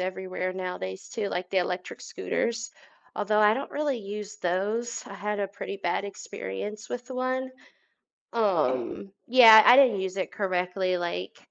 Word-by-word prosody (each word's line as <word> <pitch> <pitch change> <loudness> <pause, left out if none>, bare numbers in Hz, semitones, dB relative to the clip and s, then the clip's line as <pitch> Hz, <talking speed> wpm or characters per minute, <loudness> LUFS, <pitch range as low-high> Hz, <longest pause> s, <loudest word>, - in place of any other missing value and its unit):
everywhere 185 0 -3
nowadays 180 - -5
too, 215 -3 -3
like, 180 -1 -4
the 190 - +2
electric 180 0 -3
scooters. 230 0 -3 0.4
Although, 210 +1 +1
I 210 0 +6
don't 265 - -3
really 290 -4 -1
use 210 0 -7
those, 210 +6 -2
I - - -10
had 210 +1 -3
a 200 - 0
pretty 200 0 -7
bad 180 0 -2
experience 200 - -7
with 245 +1 -6
one, 255 0 -2 0.8
um 180 - 0
yeah, 230 -3 +9
I 245 - +9
didn't 255 -7 +5
use 190 0 -3
it 190 - -3
correctly, 185 -1 -1
like, 170 - -4
200 Hz, 150 wpm, -27 LUFS, 185-225 Hz, 0.8 s, yeah